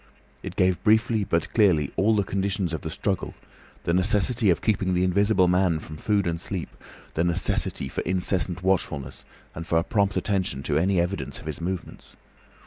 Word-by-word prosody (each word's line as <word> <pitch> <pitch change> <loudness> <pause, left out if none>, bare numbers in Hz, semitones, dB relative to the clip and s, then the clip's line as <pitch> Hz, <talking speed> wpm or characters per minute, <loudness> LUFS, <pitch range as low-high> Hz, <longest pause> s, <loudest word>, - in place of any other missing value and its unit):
It - - -7
gave 90 -1 +1
briefly 110 0 +3
but 85 -4 -1
clearly 90 - +3
all 110 +4 +3
the 100 - +2
conditions 95 -2 -1
of 80 - -3
the 80 - -5
struggle, 95 +4 -2 0.5
the 85 - 0
necessity 105 +4 +2
of 85 - +3
keeping 95 -4 +1
the 90 - +2
Invisible 95 +1 +3
Man 90 -2 +2
from 80 0 -9
food 105 +3 +1
and 85 -1 -2
sleep, 95 -3 -4 0.4
the 80 - 0
necessity 85 -5 -1
for 65 - -4
incessant 90 0 -1
watchfulness 75 -8 -1 0.3
and 85 +1 -7
for 80 - +2
a 85 - +2
prompt 100 0 0
attention 95 -8 -1
to 75 0 0
any 95 +2 +2
evidence 90 +3 -2
of - - -13
his 80 0 -4
movements. 90 +1 -6
95 Hz, 180 wpm, -25 LUFS, 85-100 Hz, 0.5 s, briefly